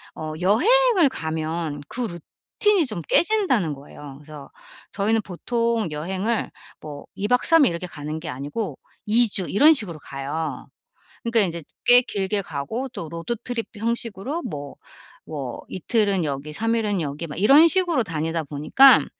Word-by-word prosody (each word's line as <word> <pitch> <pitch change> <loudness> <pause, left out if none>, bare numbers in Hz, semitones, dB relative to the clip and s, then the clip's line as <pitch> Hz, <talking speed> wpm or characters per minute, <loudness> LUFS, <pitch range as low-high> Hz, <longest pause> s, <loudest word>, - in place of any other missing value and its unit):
어 155 0 -5
여행을 375 - +4
가면 160 - -4
그 250 - -5 0.6
루틴이 405 -8 +4
좀 210 -7 -5
깨진다는 305 - +2
거예요. 140 0 -11
그래서 150 -1 -12 0.4
저희는 215 +2 +1
보통 230 +3 -1
여행을 190 +9 -2 0.3
뭐 145 -2 -9
2 205 - -2
박 250 0 +2
3 325 -3 +6
일 - - +4
이렇게 170 +2 -5
가는 150 0 -6
게 165 - -9
아니고 145 - -4 0.3
2 230 +2 +3
주 190 -2 -1
이런 300 +10 +6
식으로 175 - -2
가요. 140 +1 -5 0.6
그러니까 230 -1 +3
인제 170 -4 0 0.2
꽤 245 0 +8
길게 200 -3 -2
가고 175 - -4
또 170 -10 -7
로드 170 +9 -4
트립 245 -2 -3
형식으로 230 - -3
뭐 145 -2 -6 0.5
뭐 140 -6 -6
이틀은 200 -1 0
여기 145 +1 -4
3 225 +7 0
일은 210 -5 0
여기 150 +2 -4
막 150 - -7
이런 280 - +7
식으로 340 -6 +2
다니다 165 -2 -2
보니까 155 - +5
195 Hz, 290 characters per minute, -23 LUFS, 155-235 Hz, 0.6 s, 꽤